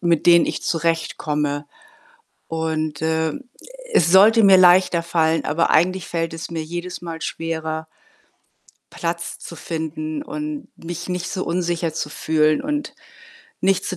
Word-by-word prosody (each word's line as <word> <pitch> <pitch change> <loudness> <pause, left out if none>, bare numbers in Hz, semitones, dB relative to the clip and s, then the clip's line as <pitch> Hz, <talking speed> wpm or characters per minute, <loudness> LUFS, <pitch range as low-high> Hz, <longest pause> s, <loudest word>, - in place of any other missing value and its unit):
mit 170 -3 +1
denen 170 -1 +7
ich - - -3
zurechtkomme. 150 -3 -1 0.8
Und, 155 -2 -2
äh, 160 0 0 0.6
es 170 0 +4
sollte 215 +4 +7
mir 195 -1 +8
leichter 180 -1 +5
fallen, 165 -1 +1
aber 165 +3 +1
eigentlich 180 +2 +2
fällt 165 -1 -2
es 165 +1 -6
mir 165 -1 -3
jedes 175 +3 -6
Mal 165 -2 -7
schwerer 160 -1 -4 1.1
Platz 170 0 -4
zu 170 - -10
finden 155 -2 -4
und 150 -1 -5
mich 175 +1 -7
nicht 180 0 -3
so 185 - -3
unsicher 170 -1 -1
zu 150 - -3
fühlen 155 0 +1
und 295 +1 -3 0.7
nicht 190 0 +2
zu 185 - -3
165 Hz, 140 wpm, -21 LUFS, 160-175 Hz, 1.1 s, mir